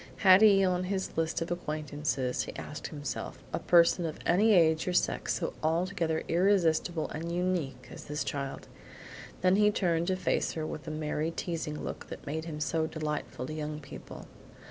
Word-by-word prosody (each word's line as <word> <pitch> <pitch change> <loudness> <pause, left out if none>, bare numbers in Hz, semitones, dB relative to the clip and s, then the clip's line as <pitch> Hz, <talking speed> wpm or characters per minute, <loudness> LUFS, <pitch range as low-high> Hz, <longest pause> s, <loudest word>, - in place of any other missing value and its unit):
Had 190 +1 +9
he 200 -3 +7
on 180 0 +1
his 190 0 -3
list 165 0 0
of 165 - -7
acquaintances, 150 -6 -2
he - - -8
asked 150 - -6
himself, 145 -6 -5 0.2
a - - 0
person 170 0 +4
of 160 -2 -3
any 205 +6 +4
age 160 -3 +4
or 180 - 0
sex - - +1
so 165 - -2
altogether 165 0 0
irresistible 175 -2 +2
and 165 +2 -4
unique 175 -5 -2
as - - -9
this 150 0 -2
child? 140 -1 -4 0.7
Then 185 +1 +4
he 210 0 +5
turned 170 -5 +1
to 190 - +2
face 185 - 0
her 160 -1 -3
with 155 0 -6
the - - -5
merry 155 0 -2
teasing 165 -3 -4
look - - -6
that - - -9
made 160 +3 -3
him 155 -2 -5
so 160 +1 0
delightful 150 -5 -4
to 155 - -6
young 150 -1 -4
people. 145 - -10
165 Hz, 180 wpm, -30 LUFS, 155-180 Hz, 0.7 s, Had